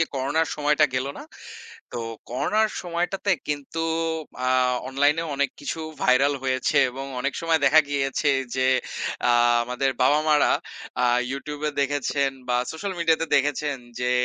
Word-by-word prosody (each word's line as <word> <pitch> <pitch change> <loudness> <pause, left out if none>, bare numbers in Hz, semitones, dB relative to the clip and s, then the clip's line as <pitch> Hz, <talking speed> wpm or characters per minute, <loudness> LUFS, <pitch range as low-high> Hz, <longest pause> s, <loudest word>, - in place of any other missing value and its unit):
যে - - +4
করোনার 140 +5 0
সময়টা 150 +1 +3
গেল 130 +1 0
না। - - -8 0.7
তো 125 - -5 0.3
করোনার 215 - +1
সময়টাতে 180 +3 -1 0.2
কিন্তু 145 +2 -4 0.7
আ - - +1 0.4
অনলাইনেও 145 +5 +1
অনেক 140 0 +1
কিছু 145 - -4 0.2
ভাইরাল 135 +3 +4
হয়েছে 130 -1 +1
এবং 135 +2 -6
অনেক 125 - -1
সময় 165 -1 +2
দেখা 150 +3 +7
গিয়েছে 140 +1 0 0.3
যে 130 0 +2 0.6
আ - - +6 0.3
আমাদের 125 +3 -1
বাবা-মারা 150 +3 +4 0.5
আ - - +5 0.3
YouTube 145 +2 -6
এ - - -8
দেখেছেন 140 -1 0 0.2
বা 125 0 +2
সোশ্যাল 190 +5 -4
মিডিয়াতে 165 -1 +2
দেখেছেন 145 0 0 0.2
যে 125 0 0
145 Hz, 140 wpm, -24 LUFS, 135-160 Hz, 0.7 s, দেখা